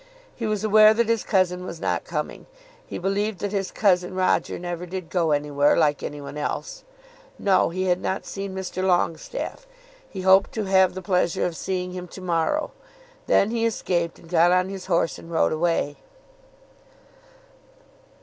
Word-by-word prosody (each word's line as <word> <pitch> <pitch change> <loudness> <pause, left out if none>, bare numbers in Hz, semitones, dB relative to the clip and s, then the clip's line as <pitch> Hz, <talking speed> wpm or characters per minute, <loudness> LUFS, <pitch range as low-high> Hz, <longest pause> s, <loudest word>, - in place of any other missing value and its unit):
He 230 - -3
was 210 -1 -1
aware 215 0 +6
that 235 0 +2
his 230 -1 +1
cousin 180 -2 +1
was 170 -2 -7
not - - -1
coming. - - -5 0.4
He - - -5
believed 200 +2 -1
that 205 - -2
his 195 -2 -1
cousin 185 -3 +1
Roger 185 0 +1
never 175 0 -5
did 180 -2 -6
go 170 -3 +1
any 145 0 0
where 145 0 +3
like 150 -3 +2
any 145 - -5
one 145 +1 -7
else. - - -4 0.5
No; 190 -4 +3
he 185 +2 -2
had 180 -1 +1
not 190 - -2
seen 195 -1 -6
Mr. 185 -1 -4
Longestaffe. 190 - -1 0.4
He 190 - -6
hoped 190 +1 +5
to 220 - -2
have 190 -2 +3
the 185 - -6
pleasure 180 -3 +1
of 175 - -3
seeing 180 +1 -3
him 180 0 -6
to 190 - -11
morrow. 180 - 0 0.6
Then 200 - +3
he 230 -1 -1
escaped, 175 -7 -1
and 170 - -17
got 170 +1 +4
on 180 +1 +2
his 195 -1 -7
horse, 170 -2 +1
and 165 - -12
rode 165 - +2
away. 155 -3 0
185 Hz, 175 wpm, -24 LUFS, 170-195 Hz, 0.6 s, aware